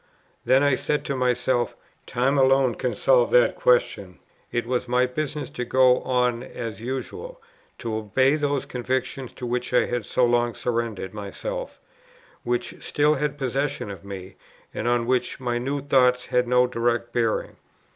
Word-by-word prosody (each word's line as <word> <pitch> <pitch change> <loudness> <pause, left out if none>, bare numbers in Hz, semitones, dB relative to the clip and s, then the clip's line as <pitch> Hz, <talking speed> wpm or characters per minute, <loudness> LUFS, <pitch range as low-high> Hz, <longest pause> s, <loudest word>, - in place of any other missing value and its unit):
Then 130 +2 +4
I 145 -1 +4
said 150 +3 -1
to 140 - -2
myself, 125 -1 0 0.3
Time 130 +4 +1
alone 135 -1 +4
can 125 -1 -2
solve 125 +2 +4
that 125 -1 +4
question. 100 -7 +1 0.3
It 120 -1 -1
was 125 +1 -1
my 125 +1 +3
business 150 +3 -3
to 135 -4 -4
go 125 +1 +4
on 125 -2 +1
as 115 -3 -7
usual, 135 - -5 0.4
to 115 -3 -4
obey 130 +6 +2
those 145 -2 -1
convictions 130 +1 -3
to 125 - -7
which 125 +1 -2
I - - +5
had 120 -3 -3
so 125 - +2
long 120 -1 +1
surrendered 115 -5 -3
myself, - - -6 0.6
which 120 0 -3
still 150 +1 +2
had 150 0 -2
possession 135 -4 -2
of 95 -3 -10
me, 95 -1 -9 0.4
and 120 - -3
on 120 -1 +2
which 125 +2 0
my 120 -2 -1
new 140 +3 -2
thoughts 125 -3 +3
had 125 0 +1
no 125 0 +4
direct 120 -1 -1
bearing. 115 -2 -1
125 Hz, 160 wpm, -24 LUFS, 120-130 Hz, 0.6 s, I